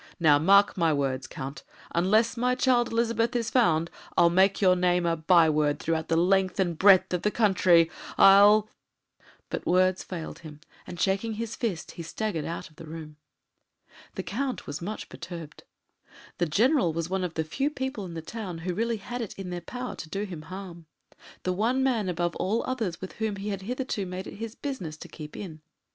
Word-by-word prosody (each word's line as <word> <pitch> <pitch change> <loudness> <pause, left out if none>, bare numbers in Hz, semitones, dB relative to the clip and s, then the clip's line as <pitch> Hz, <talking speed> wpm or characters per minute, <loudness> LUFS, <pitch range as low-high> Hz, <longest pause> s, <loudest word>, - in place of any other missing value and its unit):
Now, 150 -4 +5
mark 200 +5 +5
my 165 -3 +2
words, 135 -3 -1
Count, 135 +2 -7 0.3
unless 215 +7 +3
my 250 +1 +1
child 250 -2 +3
Elizabeth 230 +1 0
is 230 -2 -1
found, 170 -9 +2 0.3
I'll 170 0 +6
make 190 +2 +3
your 185 -2 +5
name 180 -1 +2
a 165 -1 +2
byword 155 -3 +3
throughout 160 0 -2
the 165 - +1
length 185 +2 +2
and 175 -3 +1
breadth 190 +1 +5
of 180 - 0
the 210 - +2
country 185 -6 +4 0.3
I'll 205 +2 +7 0.4
"; - - -30
but - - -4
words 185 +1 +3
failed 170 -4 -7
him, 155 -2 -11 0.3
and, 175 - -8
shaking 200 +3 0
his 225 0 -4
fist, 205 -9 -3
he - - -8
staggered 165 0 -3
out 170 +2 -5
of 155 -3 -23
the 165 - -10
room. 155 -1 -9 1.0
The - - -4
Count 255 +6 -3
was 145 +2 -6
much 210 +5 -5
perturbed. 165 -4 -9 0.7
The 175 - +2
General 215 - +3
was 165 0 -2
one 190 +1 -2
of 175 -2 -4
the 160 - 0
few 270 - -1
people 265 -7 -4
in 170 -2 -8
the 160 - -5
town 195 -2 -6
who 175 +2 -3
really 230 +4 -1
had 240 +4 -6
it 225 - -6
in 190 -2 -6
their 175 0 -4
power 250 +8 -6
to 155 - -8
do 195 +5 -3
him 180 -6 -6
harm 180 -3 -8 0.6
the 185 - 0
one 235 +7 +1
man 230 -8 +1
above 175 -1 -1
all 215 +5 0
others 225 -10 -3
with 190 - -7
whom 220 -2 0
he 200 +1 -5
had 195 -2 -3
hitherto 240 -2 -3
made 185 +1 -5
it - - -9
his 225 +1 -6
business 190 - -5
to - - -10
keep 150 -2 -10
in. 160 -6 -8
185 Hz, 200 wpm, -27 LUFS, 165-220 Hz, 1.0 s, I'll